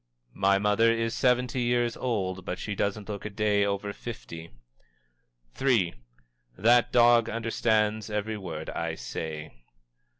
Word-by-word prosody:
"My 100 0 +3
mother 105 +3 +3
is 115 0 -1
seventy 125 0 +1
years 120 -1 +1
old, 95 -7 -2
but 90 - -4
she 105 - -4
doesn't 100 0 -2
look 105 -2 -5
a 105 - -4
day 105 0 +1
over 100 0 -2
fifty." 85 -9 -8 1.1
III. 115 -11 +3 0.6
"_That 120 +3 +4
dog 120 -1 +5
understands 110 -2 0
every 105 +1 -2
word 80 -5 -6
I - - -3
say. 75 +6 -6
105 Hz, 130 wpm, -27 LUFS, 100-115 Hz, 1.1 s, dog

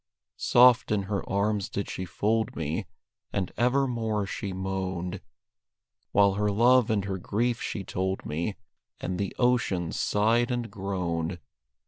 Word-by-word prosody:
Soft 125 -1 +5
in 105 -2 +1
her 100 0 -2
arms 100 0 0
did 100 - -3
she 95 - -4
fold 110 +6 0
me, 80 -1 -3 0.4
And 95 -3 -2
evermore 120 -4 +1
she 100 0 -4
moaned, 95 -1 -3 0.9
While 100 -1 +5
her 105 +1 0
love 120 +3 +4
and 105 -3 +1
her 95 -1 -3
grief 115 +6 -1
she 100 - -3
told 95 +1 -2
me, 85 +7 -2 0.4
And 90 0 -3
the 100 -2 -2
ocean 120 -9 +1
sighed 115 +4 +2
and 120 -2 -2
groaned. 90 -3 -2
100 Hz, 135 wpm, -27 LUFS, 95-115 Hz, 0.9 s, Soft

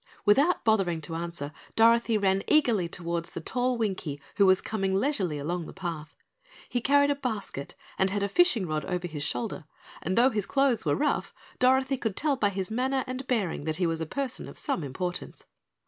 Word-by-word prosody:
Without 280 +12 +4
bothering 195 -7 +2
to 165 - -7
answer, 165 -3 -4 0.2
Dorothy 230 0 +4
ran 195 -1 +2
eagerly 235 - +3
toward 170 0 -2
the 170 - -6
tall 250 +8 -1
Winkie 185 -10 -2 0.2
who 200 - +6
was 185 0 +5
coming 195 -3 -1
leisurely 195 - 0
along 165 +4 -3
the - - -9
path. 165 -5 -6 0.5
He 245 - -2
carried 285 +2 +4
a - - +1
basket 220 - -5 0.2
and 190 - +3
had 200 +1 -1
a - - +1
fishing 240 - +3
rod 155 -2 -2
over 180 +3 -2
his 155 -3 -6
shoulder, 190 0 -2 0.4
and 185 +5 -2
though 255 +3 +5
his 210 -4 -2
clothes 275 -4 +2
were - - +2
rough, 295 0 -1 0.2
Dorothy 265 +1 +3
could 220 -5 -2
tell 295 -2 +1
by 205 -6 +2
his 195 +1 -4
manner 260 +3 0
and 255 0 -5
bearing 200 - -1
that 155 -1 -1
he 180 - +1
was 165 -1 -1
a 160 - -3
person 275 - -3
of - - -12
some 170 - -2
importance. 175 +6 -4
200 Hz, 195 wpm, -28 LUFS, 170-255 Hz, 0.5 s, who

